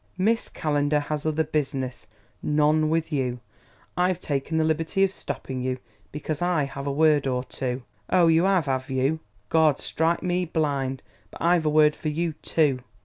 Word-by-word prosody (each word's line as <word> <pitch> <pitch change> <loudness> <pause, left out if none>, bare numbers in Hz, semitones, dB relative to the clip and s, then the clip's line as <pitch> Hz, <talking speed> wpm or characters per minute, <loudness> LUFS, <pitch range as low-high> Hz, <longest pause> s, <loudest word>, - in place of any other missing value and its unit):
"Miss 220 +5 +1
Calendar 145 -1 +1
has 150 +1 -3
other 155 0 +1
business 135 -5 -3 0.3
none 150 +1 +2
with 160 +1 0
you. 125 -4 -1 0.6
I've 180 0 +1
taken 145 0 -2
the 160 - +3
liberty 160 +4 +1
of 195 - +3
stopping 130 -8 -5
you 130 0 -1 0.3
because 150 +1 -4
I 175 -4 +2
have 140 0 -5
a - - +1
word 150 -1 +3
or 125 -1 0
two 130 -1 -4
" 100 - -38
"Ow, 180 -2 +5
you 165 +2 +4
'ave, 180 -8 +2
'ave 130 0 -3
you? 135 +4 +1 0.3
Gawd 155 -3 +4
strike 165 +2 0
me 180 0 +1
blind, 140 -5 -1 0.3
but - - -12
I've 170 -1 +3
a - - +4
word 150 0 +5
for 155 - -3
you, 165 +2 -1
too!... 145 -5 +2
150 Hz, 180 wpm, -25 LUFS, 140-165 Hz, 0.6 s, Ow